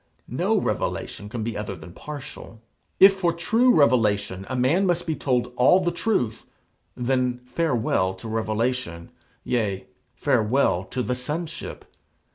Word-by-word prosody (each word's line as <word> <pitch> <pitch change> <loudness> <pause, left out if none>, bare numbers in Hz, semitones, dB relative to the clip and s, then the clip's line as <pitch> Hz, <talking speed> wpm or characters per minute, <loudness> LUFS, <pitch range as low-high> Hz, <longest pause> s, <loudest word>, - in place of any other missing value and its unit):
No - - 0
revelation 105 - -2
can 115 0 -4
be 115 -1 -3
other 105 -1 -4
than 85 +1 -12
partial. 140 -3 -9 0.4
If 195 +1 +9
for 185 -3 +1
true 225 +9 +3
revelation 105 - +2
a 130 - -2
man 150 +10 +2
must 175 -2 0
be 160 - -1
told 125 -3 -1
all 135 +9 +6
the 175 -2 0
truth, 170 - -1 0.5
then 125 0 0
farewell 120 - 0
to 95 +4 -9
revelation; 110 -5 -2 0.3
yea, 105 -6 -1 0.3
farewell 110 -5 +2
to 125 - -3
the 125 - -1
sonship. 155 +6 -5
125 Hz, 135 wpm, -24 LUFS, 110-160 Hz, 0.5 s, If